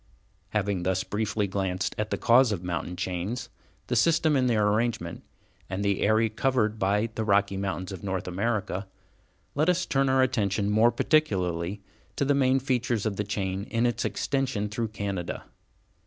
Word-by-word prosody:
Having 100 -3 -1
thus 95 +1 0
very - - -24
briefly 105 0 0
glanced 95 -1 -2
at 105 0 -2
the - - -1
cause 120 0 +5
of 95 -4 -3
mountain 90 0 -3
chains, 95 +7 -3 0.4
the - - -1
system 160 -2 +3
in 130 -2 +3
their 105 -4 +3
arrangement, 105 -5 -1 0.5
and 95 +2 -2
the 100 -1 +1
area 110 +2 +3
covered 110 -1 0
by 105 +3 +1
the 110 - -2
Rocky 100 -1 +2
Mountains 95 -2 -3
of 95 -3 -7
North 95 -2 -3
America, 100 0 -2 0.7
let 155 +5 +2
us 180 +1 +2
turn 135 0 +1
our 130 0 +4
attention 105 -5 0
more 110 +3 +5
particularly 100 - 0 0.3
to 140 - 0
the 145 - +3
main 135 -1 +3
features 125 -4 0
of 105 -3 -1
the 105 - 0
chain 100 -1 -3
in 115 0 0
its 120 - 0
extension 130 -7 -1
through 115 +2 -2
Canada. 100 -4 -4
105 Hz, 170 wpm, -27 LUFS, 95-120 Hz, 0.7 s, cause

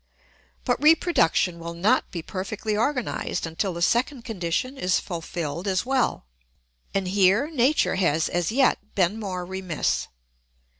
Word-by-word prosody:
But 245 0 0
reproduction 295 - +3
will 170 0 -6
not 190 +6 +2
be 170 -3 -6
perfectly 205 +4 -3
organised 250 -2 -1
until 165 +4 -2
the 170 0 -3
second 240 +4 +1
condition 220 +5 -2
is 180 -8 +1
fulfilled 170 -1 -5
as 190 +2 0
well, 260 - 0 0.7
and 195 -1 -1
here 200 - +3
nature 280 +1 +2
has 165 -4 +2
as 175 +1 -1
yet 240 -4 +1
been 195 +3 +1
more 185 -4 -4
remiss. 185 -3 -2
195 Hz, 135 wpm, -25 LUFS, 175-240 Hz, 0.7 s, reproduction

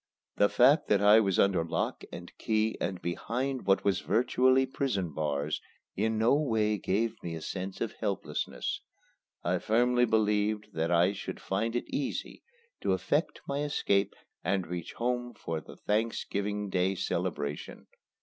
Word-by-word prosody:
The 100 - +5
fact 135 +5 +5
that 100 - +4
I 105 +2 +8
was 100 -4 +1
under 95 -4 +3
lock 80 - -2
and 85 - -9
key 110 0 +1
and 90 +1 -2
behind 125 +8 -3
what 95 - +3
were 100 - +5
virtually 125 +7 +3
prison 110 - -2
bars 75 0 -1 0.3
in 110 0 0
no 110 +4 +4
way 110 -8 +1
gave 110 +5 -1
me 85 -1 -4
a - - -5
sense 95 +3 -5
of 115 - -1
helplessness. 100 -4 -2 0.6
I 90 +2 +1
firmly 120 +4 +3
believed 105 -1 +1
that 80 +1 -1
I 90 +3 +4
should 100 - -6
find 110 +5 -1
it 120 - -1
easy 145 - -3 0.4
to - - +1
effect - - 0
my 140 0 -1
escape 100 -9 +1 0.3
and 95 -2 0
reach 85 0 -5
home 120 0 -2
for 80 -5 -4
the - - -12
Thanksgiving 105 -2 -1
Day 95 +1 +1
celebration. 70 -4 -3
105 Hz, 150 wpm, -30 LUFS, 95-115 Hz, 0.6 s, I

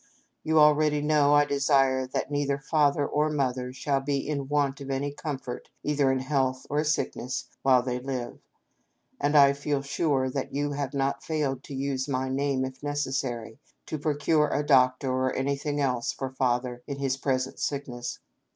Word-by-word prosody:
You 160 0 +1
already 150 0 +5
know 145 -1 +3
I 145 0 +5
desire 135 -2 +2
that 130 - -3
neither 145 -1 0
Father 145 0 +2
or 150 +2 +1
Mother 130 -4 -1
shall 135 +2 -1
be 140 0 -2
in 140 -3 -2
want 140 -1 0
of 135 - -7
any 140 +1 -2
comfort 135 -4 -6
either 145 -2 +2
in 130 - +1
health 130 -1 0
or 150 +1 +2
sick 155 0 0
ness 125 +2 -4
while 130 -2 +4
they 125 -1 -2
live; 125 -2 -5 0.8
and 145 +1 +2
I 140 -1 +7
feel 140 0 -2
sure 140 -2 0 0.2
you 145 +1 -2
have 140 -1 -3
not 140 0 0
failed 145 -5 -1
to 140 - -7
use 135 -1 -2
my 130 -1 -1
name, 135 0 0
if 130 0 -8
necessary, 130 -5 -3 0.3
to 155 - -4
procure 150 +1 +2
a 145 +1 0
doctor, 130 -1 +4
or 130 0 0
anything 140 +2 -1
else 125 -4 0
for 135 -1 -5
Father 125 -1 -1
in 140 -2 -4
his 135 -1 0
present 130 -1 -2
sickness. 125 -4 -3
140 Hz, 170 wpm, -27 LUFS, 130-145 Hz, 0.8 s, I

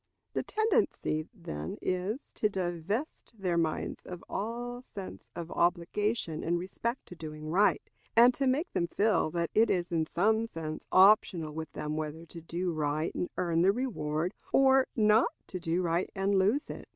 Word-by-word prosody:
The - - 0
tendency, 425 - 0
then, 80 - -6
is, 185 +8 -3
to 215 - +1
divest 195 - -3
their 180 -3 0
minds 165 -2 -1
of 180 -1 -8
all 240 +4 -4
sense 200 -6 -9
of 170 -1 -6
obligation 175 +1 0
in 175 +1 +1
respect 230 +7 -3
to 180 - -11
doing 155 -1 -7
right, 200 +4 +3 0.3
and 240 +2 +7
to 275 +1 0
make 290 +8 0
them 170 - +1
feel 205 -1 +2
that 170 0 -2
it 225 +1 +4
is 175 -1 0
in 160 -2 +1
some 220 +7 +2
sense 155 -5 -6
optional 185 -5 +5
with 160 -1 -5
them 150 0 -3
whether 155 +1 -4
to 170 0 -10
do 175 +2 -2
right 155 +1 -1
and 180 - -2
earn 170 -2 +1
the 190 +3 +5
reward, 180 -8 -2 0.2
or 265 -1 +5
not 215 0 +4 0.2
to 185 - -6
do 170 +2 0
right 170 +1 0
and 195 +1 +1
lose 205 +10 +2
it. - - -9
180 Hz, 170 wpm, -30 LUFS, 165-220 Hz, 0.3 s, and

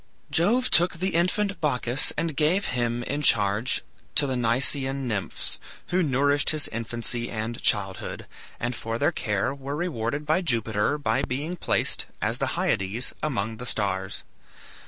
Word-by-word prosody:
Jove 235 +10 +2
took 175 +2 +4
the 185 +3 -2
infant 195 +4 +1
Bacchus 130 -2 +2
and 160 -1 -1
gave 165 +7 +2
him 120 -1 0
in 145 +4 -2
charge 105 -2 +3 0.3
to 145 - +5
the 135 - -1
Nysaean 130 +3 +2
nymphs, 105 -5 +1 0.3
who 185 +1 +2
nourished 145 -1 +2
his 155 -2 +2
infancy 115 +1 -3
and 110 +1 -4
childhood, 95 -3 -1 0.3
and 120 0 -2
for 115 +1 -3
their - - +2
care 105 +4 -1
were 140 +1 -5
rewarded 150 -4 -2
by 155 +5 +2
Jupiter 115 - +1
by 130 -3 0
being 145 +6 -3
placed, - - 0
as - - -1
the - - 0
Hyades, 100 +6 0
among 115 -7 -2
the 125 - -7
stars. 95 -4 -1
130 Hz, 150 wpm, -26 LUFS, 115-150 Hz, 0.3 s, to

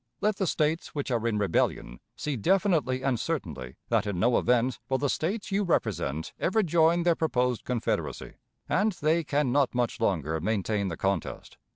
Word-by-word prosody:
Let 210 -1 +1
the 190 - 0
States 155 +1 -1
which 140 -2 -3
are 120 -1 0
in 110 -2 0
rebellion 80 -10 0 0.2
see 150 -2 -3
definitely 150 - +1
and 130 -4 +1
certainly 80 - -4
that - - +1
in 100 -4 -2
no 120 +4 +3
event 125 0 +1
will 130 - +2
the 140 0 0
States 200 +6 -2
you 195 +1 +2
represent 80 - -1
ever 215 +5 +2
join 170 0 +3
their 175 0 +4
proposed 125 -8 0
confederacy, 125 -3 -2 0.3
and 210 +2 +2
they 165 0 +1
can 145 -3 0
not 135 -2 +2
much 120 0 0
longer 80 -7 0
maintain 105 +1 0
the 85 -3 -4
contest. 95 -4 -3
130 Hz, 175 wpm, -28 LUFS, 105-165 Hz, 0.3 s, their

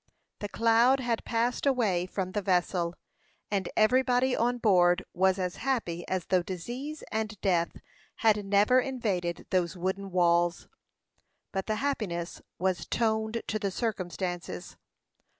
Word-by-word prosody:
The 205 - -4
cloud 230 +5 +4
had 240 -3 -1
passed 240 +4 0
away 205 -10 +2
from 185 -1 -3
the 205 - -1
vessel, 180 -2 0 0.6
and 195 -3 0
everybody 250 +3 +3
on 245 +2 +1
board 180 -5 +4
was 190 +1 +3
as 180 -2 -3
happy 225 -10 -2
as 185 -2 -2
though 185 -1 +2
disease 240 - -6
and 220 -1 -3
death 175 -4 +1 0.4
had 215 -2 +3
never 205 +6 +4
invaded 205 -10 -2
those 180 -1 0
wooden 190 +2 -2
walls. 175 -1 +2 0.8
But 190 -1 -3
the 215 - 0
happiness 210 -10 -3 0.2
was 185 -1 -1
toned 220 0 0
to 215 - -2
the 200 -2 -1
circumstances. 180 - -4
200 Hz, 130 wpm, -29 LUFS, 180-230 Hz, 0.8 s, cloud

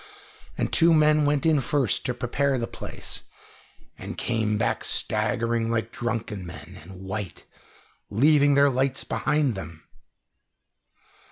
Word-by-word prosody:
And - - -2
two 165 0 +5
men 155 -1 +4
went 145 0 +1
in 160 -3 +4
first 135 -3 0
to 125 - -1
prepare 135 +3 0
the 120 - -1
place, - - -6 0.7
and - - -7
came 110 -2 0
back - - -1
staggering 115 +1 0
like 115 0 -1
drunken 115 -5 -3
men, 85 0 -10
and 90 +5 -12
white, 95 -2 -6 0.6
leaving 145 +5 +4
their 140 0 +5
lights 135 +1 0
behind 150 -4 0
them. 85 -5 -9
120 Hz, 125 wpm, -25 LUFS, 105-140 Hz, 0.7 s, two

